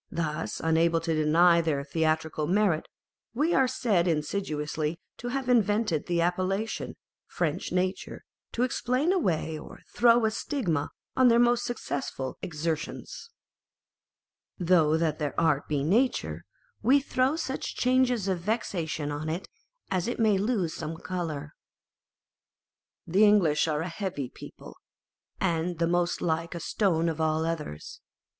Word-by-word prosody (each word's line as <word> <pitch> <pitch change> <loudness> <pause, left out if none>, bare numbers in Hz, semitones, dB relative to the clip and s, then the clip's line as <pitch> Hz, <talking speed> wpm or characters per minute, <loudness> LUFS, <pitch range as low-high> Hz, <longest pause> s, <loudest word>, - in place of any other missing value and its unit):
Thus 160 -3 -3
unable 165 +1 +2
to 165 0 -1
deny 170 +3 +4
their 150 -4 -1
theatrical 155 0 -1
merit, 185 -3 +2 0.5
we 310 +7 +2
are 265 -1 +4
said 215 -9 +1
insidiously 155 -1 -2 0.2
to 245 - -6
have 260 +1 -2
invented 210 -8 +2
the 175 -1 +1
appellation, 185 +5 -1 0.3
French 170 0 -2
nature, 185 +1 -2 0.3
to 240 - 0
ex 255 - -1
plain 260 +9 +1
away 160 - 0
or - - -12
throw 235 0 +5
a 220 - +2
stigma 185 - -1 0.3
on 260 -1 +5
their 235 -1 +5
most 240 0 +3
successful 140 - -4
exertions: 165 - -4 1.3
Though 165 -3 +3
that 160 -2 0
their 145 -3 -2
art 150 -4 +2
be 145 -2 0
nature, 230 - +1 0.4
We 260 +6 +5
throw 270 +1 +1
such 270 -5 -4
changes 250 -4 +2
of 185 -2 0
vexation 170 -7 -2
on 150 +2 -4
it, 170 +4 -4 0.4
As 185 0 0
it 240 - -3
may 215 -4 +3
lose 200 -6 0
some 160 0 -5
colour. 160 -5 -4 1.5
The 190 +6 +3
English 190 -8 +4
are 150 -1 0
a 165 - -3
heavy 170 - -4
people, - - -12 0.6
and 170 -1 0
the 170 - +1
most 175 +1 0
like 165 +1 -1
a - - -4
stone 170 -2 +1
of 160 -1 -2
all 160 0 +1
others. 155 - -5
170 Hz, 140 wpm, -28 LUFS, 160-220 Hz, 1.5 s, throw